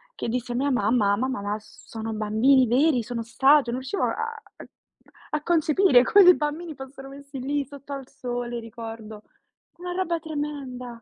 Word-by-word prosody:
che - - -4
dissi 245 +1 -3
a - - -3
mia 280 +3 +1
mamma: 210 -3 +2
"Mamma, 260 -4 -2
ma 205 +1 -2
sono 220 +1 -8
bambini 225 +5 +3
veri? 255 +1 +3
Sono 230 0 -4
statue?", 270 +2 +3
non 255 +2 -3
riuscivo 265 +10 -3
a 455 0 -3 0.9
a 300 0 -2
concepire 320 -4 +4
come 400 +6 +6
dei 360 0 +9
bambini 310 +2 -3
fossero 270 0 -10
messi 280 0 -10
lì 285 +2 -1
sotto 280 +1 -10
al 270 -2 -7
sole, 245 -3 -5
ricordo. 225 -2 -9 0.5
Una 355 0 -5
roba 350 -2 -1
tremenda! 290 -5 -5
265 Hz, 165 wpm, -25 LUFS, 235-295 Hz, 0.9 s, dei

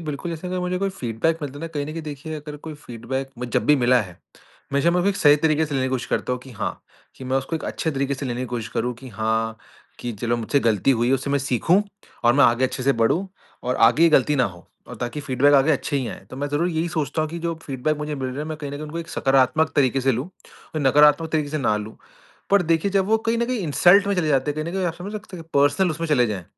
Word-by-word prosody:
बिल्कुल, 155 +1 -5
जैसे 165 +2 -6
अगर 180 0 -2
मुझे 180 0 -1
कोई 195 +1 0
फ़ीडबैक 160 - -1
मिलता 145 -1 -5
है - - -10
ना, 165 - -4
कहीं 145 -3 -4
न 155 - -6
कहीं 165 0 -5
देखिए 150 +1 -6
अगर 150 -1 -7
कोई 155 - -5
फ़ीडबैक 130 0 -5
मे 125 - -4
जब 120 - 0
भी 150 - +6
मिला 125 -1 +4
है, 95 -5 -7 0.6
हमेशा 140 +5 +2
मैं 180 +1 +2
उसको 195 +2 0
सही 145 -1 +6
तरीक़े 155 +1 +2
से 145 - -5
लेने 130 -1 +1
की - - -3
कोशिश 130 -2 -2
करता - - -1
हूँ 125 - -3
कि 130 - -13
हाँ, 110 - -4 0.4
कि 130 - -9
मैं 130 +1 0
उसको 135 +5 -2
एक - - -7
अच्छे 160 - -2
तरीक़े 140 -1 -1
से 135 +1 -5
लेने 120 0 -3
की 130 - -3
कोशिश 120 -2 -4
करूँ 125 +2 -2
कि 135 - -9
हाँ, 110 0 -1 0.4
कि 120 - -4
चलो 120 0 0
मुझसे 120 +5 0
गलती 115 0 +2
हुई 120 -2 +2
है, 135 - +4
उससे 135 +1 -3
मैं 140 - +2
सीखूँ। 140 - +2 0.4
और 120 - +6
मैं 140 0 +6
आगे 120 +2 +3
अच्छे 130 0 -2
से 140 +2 +3
बढ़ूँ 170 +12 +2 0.4
और 125 +1 -1
आगे 135 +8 +1
ये 170 - +7
गलती 150 -1 +3
ना 125 - +3
हो 90 -4 -7 0.2
और - - -8
ताकि 120 +5 -3
फ़ीडबैक 140 0 +3
आगे 140 +3 +5
अच्छे 145 0 -1
ही 130 -3 -1
आएँ। 95 - -9
तो - - -8
मैं 145 +2 -3
ज़रूर 150 +5 0
यही 165 0 -1
सोचता 155 -1 -1
हूँ 155 - -2
कि 170 - -5
जो 170 0 -2
फ़ीडबैक 140 +3 -2
मुझे 150 0 -4
मिल 135 -2 -3
रहा 130 +2 -6
है, 150 - -2
मैं 155 0 -5
कहीं 145 -2 -5
न 145 - -6
कहीं 145 - -6
उनको 155 +2 -6
एक 165 -1 -6
सकारात्मक 135 +3 +2
तरीक़े 135 -1 +3
से 135 0 +2
लूँ 125 +6 -2 0.5
और 155 - -1
नकारात्मक 150 +4 +5
तरीक़े 150 -2 0
से 155 - -2
ना 115 -6 +1
लूँ। 105 +1 -7 0.5
पर 200 -2 +5
देखिए 165 +3 +1
जब 195 -1 +2
वो 220 +1 +4
कहीं 230 +1 +2
न 235 - +2
कहीं 250 0 -1
इंसल्ट 180 +3 +4
में 200 - +1
चले 175 -4 0
जाते 140 0 +2
हैं, - - -3
कहीं 155 +2 -3
न - - -3
कहीं 190 -1 0
आप 165 - -2
समझ 185 +5 -8
सकते 210 -3 -8
हैं 165 - -9
कि - - -30
पर्सनल 145 +6 +3
उसमें 165 +2 -3
चले 130 -5 +3
जाएँ, 100 -5 -4
145 Hz, 290 wpm, -23 LUFS, 130-165 Hz, 0.6 s, ये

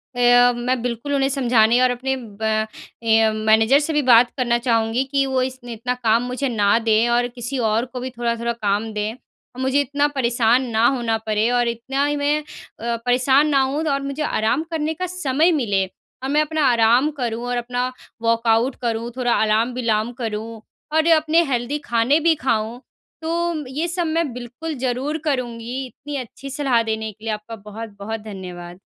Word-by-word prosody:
अ, 245 0 +5
मैं 245 0 -1
बिल्कुल 245 +4 -3
उन्हें 270 -1 +2
समझाने 245 -3 +3
और 255 - +4
अपने 260 +2 -2
ब 220 -5 -11
अ, 220 +1 0
मैनेजर 220 +5 +4
से 310 +1 -2
भी 295 - +2
बात 245 -2 +6
करना 240 -2 +2
चाहूँगी 230 0 +1
कि 275 -1 +2
वो 265 -1 0
इसने 255 -2 -4
इतना 245 +3 -2
काम 230 +1 +3
मुझे 255 +3 -2
ना 205 -2 +3
दें 225 +1 +2
और 240 +1 +2
किसी 245 +2 -5
और 225 +3 +1
को 250 0 -7
भी 255 - -4
थोड़ा-थोड़ा 235 0 -1
काम 215 0 -1
दें। 210 +2 -2 0.4
मुझे 265 +2 +1
इतना 285 +2 +1
परेशान 245 -3 +2
ना 225 +1 +2
होना 235 -4 0
पड़े 215 +1 +1
और 245 -1 +2
इतना 265 +5 -1
ही 290 - 0
मैं 290 +1 +1 0.4
अ, 235 +1 -1
परेशान 260 +4 +3
ना 275 - +3
होऊँ 275 +4 -1
और 275 - -1
मुझे 275 +2 -3
आराम 240 +4 0
करने 315 -1 -1
का 365 +3 -3
समय 335 -2 +1
मिले। 205 - +1 0.4
और 265 - -2
मैं 300 +2 +3
अपना 305 -1 0
आराम 235 +5 +4
करूँ 235 0 -2
और 245 0 -1
अपना 245 +1 -2 0.3
वर्कआउट 230 +2 +2
करूँ, 235 0 -2
थोड़ा 245 -2 +1
आलाम-विलाम 225 +1 +1
करूँ 225 -1 -5 0.3
और 315 +1 +3
अपने 315 +2 +3
हेल्दी 245 +4 -1
खाने 240 +6 +2
भी 325 0 +3
खाऊँ। 230 -1 -1 0.4
तो, 330 -2 -2
ये 300 +7 -2
सब 345 0 -1
मैं 320 -3 0
बिल्कुल 250 +6 -6
ज़रूर 265 +5 -1
करूँगी। 250 -1 -2
इतनी 285 +3 -9
अच्छी 270 +2 -8
सलाह 265 -4 +1
देने 220 -1 -3
के 215 +2 -22
लिए 220 - -1
आपका 210 +2 -7
बहुत-बहुत 210 0 -7
धन्यवाद। 180 -4 -9
245 Hz, 180 wpm, -21 LUFS, 225-275 Hz, 0.4 s, बात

